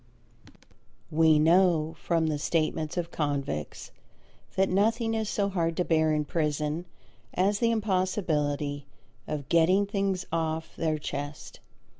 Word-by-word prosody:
We 160 0 +5
know 165 0 +3
from 165 0 +1
the 155 -2 -1
statements 155 0 -1
of 170 -1 -2
convicts 140 - -3 0.6
that 190 0 +3
nothing 225 +4 +1
is 220 -2 -1
so 200 -1 0
hard 165 -4 -1
to 180 - +1
bear 160 -1 +2
in 150 -1 0
prison 150 +1 -1 0.5
as 200 +3 +2
the 230 - +3
impossibility 160 -9 -1 0.4
of 150 -3 -4
"getting 180 +4 +4
things 195 -2 -1
off 160 -1 -2
their 160 -2 0
chest." 145 0 -6
165 Hz, 125 wpm, -28 LUFS, 150-190 Hz, 0.6 s, We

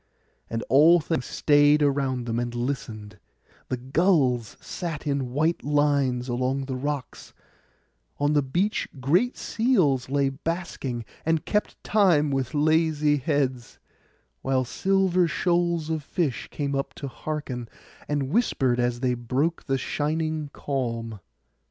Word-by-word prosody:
And 115 0 -3
all 155 +7 +6
things 155 -4 -2
stayed 145 0 +4
around 135 -3 0
and 120 +1 -2
listened; 110 -5 -4 0.5
the 130 - -1
gulls 130 - +1
sat 165 -5 -5
in 140 -4 -1
white 155 +6 0
lines 140 -4 +1
along 130 +2 -1
the 130 -1 -4
rocks; 140 0 -5 0.8
on 145 +1 +2
the 145 - +4
beach 175 +11 -1
great 175 - +2
seals 175 - +1
lay 140 0 +2
basking, 135 -5 -4 0.2
and 160 -1 0
kept 210 0 -2
time 175 -9 +3
with 135 +2 -2
lazy 155 -1 +3
heads; 130 -4 -1 0.6
while 130 -1 +1
silver 185 +4 +2
shoals 170 0 0
of 160 -1 -1
fish 145 -4 -2
came 140 -1 -3
up 135 0 -3
to 140 - -6
hearken, 130 -4 -5 0.4
and 145 -2 -1
whispered 135 - +1
as 120 0 0
they 125 -2 +1
broke 130 +8 -1
the 135 -1 0
shining 155 +2 -2
calm. 115 -7 -3
145 Hz, 125 wpm, -25 LUFS, 130-160 Hz, 0.8 s, all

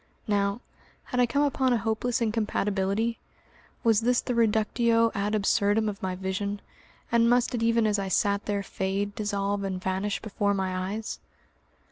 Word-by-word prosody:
Now, 200 +1 0 0.4
had 250 - -3
I 245 - +4
come 285 +4 +1
upon 265 -3 +2
a - - +3
hopeless 225 +3 -1
incompatibility? 215 0 0 0.6
Was 225 -2 +4
this 245 +1 +2
the 250 - -2
reductio 230 +1 +2
ad 205 +1 -1
absurdum 205 +1 +2
of 200 -2 -4
my 185 -1 -2
vision, 195 +2 -3 0.5
and 235 0 +4
must 245 0 +2
it 240 - -1
even 230 0 +3
as 210 -1 +2
I 195 - -2
sat 200 +2 +1
there 200 -1 -1
fade, 195 +1 -2
dissolve, 200 -1 -1
and 190 -1 -3
vanish 190 +2 -2
before 205 -2 -1
my 185 0 -2
eyes? 220 0 -5
210 Hz, 160 wpm, -27 LUFS, 200-230 Hz, 0.6 s, I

